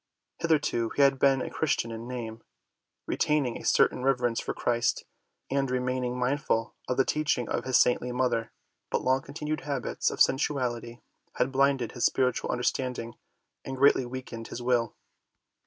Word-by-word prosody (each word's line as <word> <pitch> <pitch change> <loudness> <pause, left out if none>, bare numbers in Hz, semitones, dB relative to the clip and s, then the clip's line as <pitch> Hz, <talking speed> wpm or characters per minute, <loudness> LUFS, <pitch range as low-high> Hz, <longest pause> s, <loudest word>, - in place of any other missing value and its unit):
Hitherto 145 -8 +1
he 140 - +4
had 135 -1 +4
been 135 -1 +3
a - - -6
Christian 135 -6 0
in 115 +1 -7
name, 115 -3 -6 0.6
retaining 150 -6 +1
a - - -7
certain - - +3
rever 130 -1 +2
ence 115 -1 0
for - - -3
Christ 120 0 0 0.5
and 135 -1 +1
remaining 125 0 -1
mindful 125 -3 0
of 125 - -1
the 135 - +4
teaching 145 -6 0
of - - -2
his 130 -1 +3
saintly 125 0 +2
mother. 125 -3 0 0.4
But - - -1
long 130 +1 +2
continued 150 +2 -4
habits 140 -3 -1
of - - -6
sensuality 125 -4 +1 0.3
had 130 - +1
blinded 135 -3 +2
his 120 - -4
spiritual 125 -2 +1
understanding 125 -1 -2 0.5
and 135 0 -5
greatly 135 -2 +4
weakened 120 -2 -7
his - - -6
will. 120 -2 0
125 Hz, 155 wpm, -28 LUFS, 120-135 Hz, 0.6 s, he